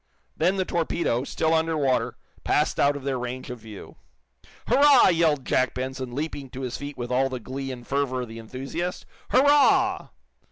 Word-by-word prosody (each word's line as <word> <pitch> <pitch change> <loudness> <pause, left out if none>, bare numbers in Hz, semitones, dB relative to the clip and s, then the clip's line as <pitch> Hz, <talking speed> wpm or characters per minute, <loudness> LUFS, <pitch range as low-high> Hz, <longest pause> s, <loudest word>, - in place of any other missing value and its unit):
Then 190 - +2
the 190 -1 0
torpedo, 165 -8 -1
still 160 +2 0
under 160 0 +1
water, 135 -3 0 0.3
passed - - +1
out 145 +1 +3
of 145 - -7
their 135 -2 -2
range 125 +1 -5
of 125 - -7
view. 110 -2 -11 0.7
"Hurrah!" 275 0 +6
yelled 160 -6 +2
Jack 130 -1 +1
Benson, 130 -1 -4
leaping 145 -2 -4
to 130 +1 -8
his 125 -2 -4
feet 145 0 -7
with 120 0 -5
all 135 +2 +2
the 130 -1 -5
glee 135 +3 -5
and 120 -2 -9
fervor 135 -2 -1
of 125 - -5
the 115 +1 -9
enthusiast. 135 +10 -5 0.2
"Hurrah!" 285 +2 +4
135 Hz, 175 wpm, -25 LUFS, 125-160 Hz, 0.7 s, Hurrah